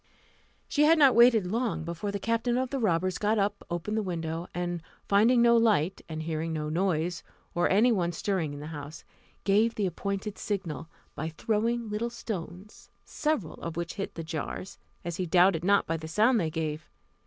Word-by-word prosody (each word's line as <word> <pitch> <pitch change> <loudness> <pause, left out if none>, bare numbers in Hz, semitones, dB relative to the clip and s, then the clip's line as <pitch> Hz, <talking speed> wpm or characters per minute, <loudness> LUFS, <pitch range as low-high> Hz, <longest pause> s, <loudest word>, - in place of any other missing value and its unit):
She 300 0 +3
had 325 +2 +6
not 280 -4 +6
waited 235 -4 +6
long 220 -2 -1
before 170 +5 -4
the 200 - -2
captain 230 +3 0
of 255 0 -1
the 275 - -1
robbers 185 -4 +1
got 215 +1 +1
up, 205 0 0
opened 175 +5 -3
the 220 - +1
window, 165 -2 -3
and 175 -1 -3 0.3
finding 230 +5 +5
no 235 0 +6
light, 205 -6 +2
and 160 0 -4
hearing 160 0 -2
no 155 -1 -2
noise, 170 0 0 0.3
or 175 - +2
any 220 +6 +4
one 175 -6 +1
stirring 175 -3 -1
in 145 - -7
the - - -7
house, 145 +1 -8 0.4
gave 215 +3 +3
the 205 - 0
appointed 200 +2 -3
signal, 180 -7 -3 0.3
by 160 +2 -4
throwing 225 +7 -1
little 215 +3 -2
stones, 200 -4 -7 0.2
several 300 - -2
of 165 -1 -5
which 170 0 -3
hit 200 - -5
the 165 - -5
jars, 165 +3 -5 0.3
as 170 0 -3
he 185 - -2
doubted 175 0 +4
not 200 +2 +4
by 165 - -1
the 160 0 -7
sound 220 +8 +3
they 160 - 0
gave. 155 -1 -4
190 Hz, 190 wpm, -28 LUFS, 165-220 Hz, 0.4 s, had